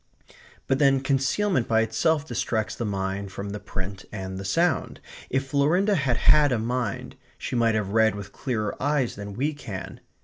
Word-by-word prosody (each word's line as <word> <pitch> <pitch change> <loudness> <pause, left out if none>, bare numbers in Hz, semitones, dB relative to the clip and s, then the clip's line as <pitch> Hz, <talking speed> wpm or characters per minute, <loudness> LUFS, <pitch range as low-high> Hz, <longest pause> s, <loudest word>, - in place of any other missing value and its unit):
But 135 - +1
then 135 -2 +4
concealment 135 - +1
by 110 0 +3
itself 145 +8 +1
distracts 115 -3 -1
the 120 - -3
mind 95 0 -2
from 100 +1 -5
the 105 - -5
print 95 0 -6
and 95 -2 -5
the - - -5
sound. 160 - +1 0.3
If 135 +1 0
Florinda 160 +9 +3
had 135 -9 +1
had 150 -2 +5
a 125 - +2
mind, 120 -1 -3 0.2
she - - -4
might 115 -2 +3
have 105 -3 -1
read 110 0 +3
with 100 -1 -8
clearer 110 -5 -2
eyes 140 -3 +1
than 100 0 -7
we 145 +6 0
can. 105 -10 -7
115 Hz, 175 wpm, -26 LUFS, 100-140 Hz, 0.3 s, had